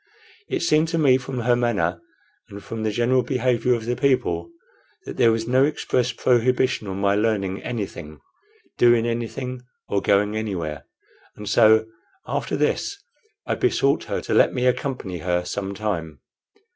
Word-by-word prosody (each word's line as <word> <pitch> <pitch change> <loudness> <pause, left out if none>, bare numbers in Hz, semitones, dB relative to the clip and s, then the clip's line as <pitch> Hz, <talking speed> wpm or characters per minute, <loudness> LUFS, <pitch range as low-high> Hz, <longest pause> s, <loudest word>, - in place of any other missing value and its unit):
It - - -1
seemed 155 -1 +3
to 165 +1 -2
me, 135 -5 +5
from 130 -1 -5
her 120 +1 +3
manner 120 -3 0 0.5
and 100 0 -10
from 115 -1 -6
the 110 - 0
general 120 +4 +2
behavior 125 -2 +1
of 115 -2 -5
the 120 +1 -1
people, 140 - 0 0.6
that - - -7
there 115 - +5
was 115 0 -2
no 130 +2 +4
express 130 -4 0
prohibition 125 -1 +1
on 95 0 -4
my 100 0 +2
learning 100 -3 0
anything, 90 -10 -6 0.6
doing 120 -1 +5
anything, 120 +2 -4 0.3
or 100 - 0
going 105 +1 +2
anywhere; 85 -10 -4 0.5
and 105 - -9
so, 110 +1 +5 0.4
after - - -2
this, 400 - -1 0.5
I - - -1
besought - - +1
her - - -3
to - - -3
let - - +4
me 125 0 0
accompany 125 -8 -1
her 90 +1 -1
some 100 +1 -4
time. 85 -9 -4
115 Hz, 160 wpm, -23 LUFS, 100-125 Hz, 0.6 s, me